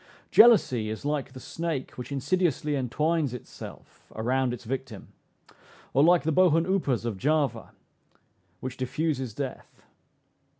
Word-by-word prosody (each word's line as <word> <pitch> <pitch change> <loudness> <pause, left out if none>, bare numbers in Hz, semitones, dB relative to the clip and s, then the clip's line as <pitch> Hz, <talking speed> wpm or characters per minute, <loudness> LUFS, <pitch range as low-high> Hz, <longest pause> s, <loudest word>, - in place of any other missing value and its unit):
Jealousy 130 - +6
is 110 +5 -6
like 145 -3 -2
the 130 - -9
snake 165 -2 -4
which 125 +2 -9
insidiously 150 +1 0
entwines 145 +2 0
itself 125 - -12
around 125 +3 0
its 120 0 -6
victim; 125 -3 -6 0.8
or 140 - +4
like 175 +1 +5
the 160 - 0
bohun 165 0 +4
upas 170 -11 0
of 115 -4 -3
Java, 140 -5 0 0.9
which 130 0 -5
diffuses 130 -3 -2
death. 135 -3 -7
135 Hz, 125 wpm, -27 LUFS, 125-160 Hz, 0.9 s, Jealousy